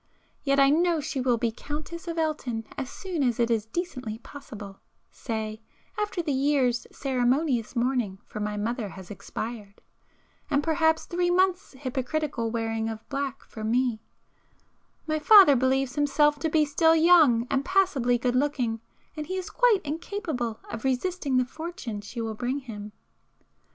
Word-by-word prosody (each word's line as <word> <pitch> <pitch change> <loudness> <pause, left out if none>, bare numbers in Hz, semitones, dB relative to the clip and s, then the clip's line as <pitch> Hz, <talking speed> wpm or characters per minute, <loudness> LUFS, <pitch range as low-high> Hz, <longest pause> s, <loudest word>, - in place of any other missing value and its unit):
Yet 275 -1 +2
I 275 0 +6
know 335 +1 +3
she 300 -2 -3
will 250 -2 +2
be 230 0 0
Countess 305 +7 -7
of 335 0 -4
Elton 280 -8 -1
as 260 - -4
soon 365 -2 -4
as 245 -4 +1
it 235 0 +2
is 220 -2 0
decently 255 -7 -4
possible,—say, 220 -2 -8 0.3
after 415 -4 -2
the 310 - -1
year's 265 -3 +1
ceremonious 260 -1 0
mourning 240 -5 0
for - - -7
my 210 0 -2
mother 225 +1 -2
has 190 -1 -10
expired, 205 +1 -6 0.7
and 290 -1 +2
perhaps 320 0 +2
three 350 0 0
months' 365 -1 +2
hypocritical 260 -1 -2
wearing 225 -1 -2
of 225 0 -7
black 275 -1 -3
for 220 - -9
me,—my 250 +6 -4
father 380 -3 +8
believes 260 +1 +1
himself 295 0 +2
to 320 - 0
be 310 -1 +3
still 320 +3 +4
young 315 -8 +6
and 270 - +1
passably 305 -10 +2
good 245 +1 0
looking, 255 -5 0 0.3
and 305 -1 -5
he 375 +2 -3
is 370 - -5
quite 475 -6 +4
incapable 300 - -3
of 230 - -6
resisting 270 +1 0
the 255 - +3
fortune 310 - -6
she 220 +4 -8
will 225 -1 -3
bring 245 +5 -2
him. 215 -6 -8
265 Hz, 150 wpm, -27 LUFS, 230-315 Hz, 0.7 s, father